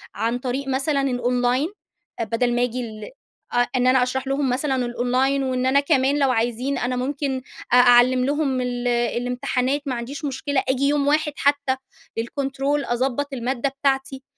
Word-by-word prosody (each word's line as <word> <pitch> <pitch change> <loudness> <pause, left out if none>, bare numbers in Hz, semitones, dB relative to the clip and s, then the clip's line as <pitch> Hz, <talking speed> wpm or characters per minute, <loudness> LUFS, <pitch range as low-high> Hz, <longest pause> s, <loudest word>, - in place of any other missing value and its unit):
عن 235 +2 -1
طريق 265 +2 -3
مثلًا 275 +2 +1
الأونلاين 250 +1 +1 0.5
أ 230 - +1
بَدَل 240 +2 0
ما 245 - +2
آجي 245 +1 -2
ال 220 - -7 0.4
آه 245 0 +3
إن 255 0 +2
أنا 255 -1 +5
أشرح 265 +1 -2
لهم 275 -1 0
مثلًا 265 +2 0
الأونلاين 255 +2 0
وإن 255 -1 -1
أنا 265 +2 +4
كمان 280 -1 +2
لو 275 -2 +3
عايزين 245 +4 -1
أنا 250 +1 -1
ممكن 265 +1 -2 0.3
أ - - +8
أعلّم 250 +1 +6
لهم 280 -2 0
ال 245 0 -2
الامتحانات 250 +3 0
ما 260 -3 -2
عنديش 275 +6 -5
مشكلة 280 0 -1
آجي 260 +1 +1
يوم 285 -1 +1
واحد 300 0 +2
حتّى 285 -2 +1 0.4
للكونترول 275 +4 -1
أضبّط 265 +3 -1
المادة 255 +2 -1
بتاعتي. 270 -1 -1
260 Hz, 165 wpm, -22 LUFS, 245-275 Hz, 0.5 s, أ